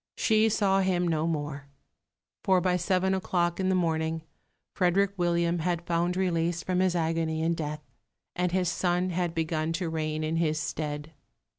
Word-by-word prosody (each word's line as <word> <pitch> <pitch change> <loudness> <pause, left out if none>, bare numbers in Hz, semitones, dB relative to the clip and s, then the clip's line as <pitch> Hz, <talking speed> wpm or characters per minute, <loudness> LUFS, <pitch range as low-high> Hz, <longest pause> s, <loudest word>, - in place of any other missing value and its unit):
She 220 0 +3
saw 195 -2 +2
him 180 -2 +1
no 160 -1 0
more; 145 -3 -3 0.8
for 190 -1 +4
by 180 0 +1
seven 185 +1 +1
o'clock 175 -2 0
in 190 0 +1
the 190 - +3
morning 160 -2 0 0.5
Frederick 190 +2 +2
William 170 -1 +1
had 170 0 -1
found 175 +1 0
release 170 -2 0
from 185 -1 0
his 185 -1 +2
agony 160 -1 0
in 165 +1 +2
death, 150 -2 -4 0.5
and 180 0 0
his 185 0 +1
son 180 +1 0
had 175 -1 -1
begun 160 0 -1
to 170 -1 -2
reign 155 -1 -2
in 160 +1 -1
his 155 -2 +1
stead. 150 0 -4
170 Hz, 165 wpm, -28 LUFS, 160-180 Hz, 0.8 s, for